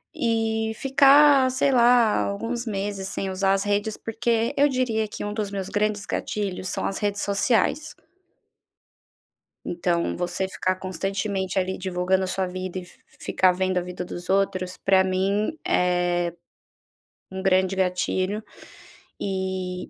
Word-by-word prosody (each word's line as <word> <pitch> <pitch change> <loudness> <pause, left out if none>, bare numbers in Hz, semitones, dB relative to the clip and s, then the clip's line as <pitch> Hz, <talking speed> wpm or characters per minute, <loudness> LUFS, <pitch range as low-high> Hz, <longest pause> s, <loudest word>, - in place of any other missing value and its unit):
e 225 -1 0
ficar, 275 +1 +5
sei 260 +2 +2
lá, 240 -3 +5
alguns 230 +4 -3
meses 200 -2 -3
sem 195 - -3
usar 195 +1 +1
as 195 - 0
redes, 205 +1 0
porque 225 0 -1
eu 285 +1 +5
diria 245 -5 0
que - - -7
um 205 - -3
dos 210 -2 -3
meus 195 -2 -4
grandes 210 0 -1
gatilhos 190 -3 -3
são - - -3
as 195 - -2
redes 205 0 -1
sociais. 235 +9 +1 1.7
Então, 170 0 -1
você 175 +2 -2
ficar 185 -1 -1
constantemente 190 +1 -2
ali 190 0 -2
divulgando 185 0 0
a - - -2
sua 185 0 -1
vida 185 0 -5
e 180 - -10 0.3
ficar 185 -1 +2
vendo 185 0 -1
a 180 - +2
vida 180 0 -6
dos 175 0 -8
outros, 190 -2 0
pra 190 -1 +3
mim 195 +9 0
é 175 -1 +1 1.0
um 190 0 -5
grande 190 0 +2
gatilho. 185 +2 -1 0.8
E 190 -1 -3
195 Hz, 140 wpm, -24 LUFS, 185-220 Hz, 1.7 s, ficar